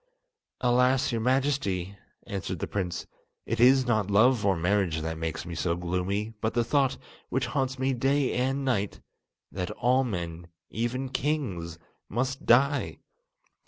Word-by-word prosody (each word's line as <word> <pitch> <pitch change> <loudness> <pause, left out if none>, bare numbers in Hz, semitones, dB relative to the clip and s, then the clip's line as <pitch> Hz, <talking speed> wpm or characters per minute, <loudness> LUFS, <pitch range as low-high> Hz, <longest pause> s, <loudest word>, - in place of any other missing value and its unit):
"Alas! 125 +1 +3
your 115 -1 -1
Majesty," 125 -8 0 0.3
answered 95 -3 -4
the - - -3
prince, 90 -3 -3 0.4
"it - - -2
is 130 +2 +6
not 110 -5 +1
love 110 +3 +4
or 100 -1 +3
marriage 90 -2 +1
that 80 +1 -3
makes 80 -2 -3
me 85 - -6
so 85 +1 0
gloomy; 90 +5 -2
but 110 +1 -1
the 120 - +3
thought, 135 +2 +1 0.3
which 130 +1 0
haunts 130 +1 -1
me 130 +1 +1
day 135 +2 +1
and 135 +2 0
night, 105 -6 -1 0.5
that 90 -1 -3
all 130 +2 +2
men, 85 -7 -4 0.2
even 120 +4 -2
kings, 125 - -2 0.3
must 130 +5 -2
die. 140 +4 +3
115 Hz, 145 wpm, -28 LUFS, 90-130 Hz, 0.5 s, is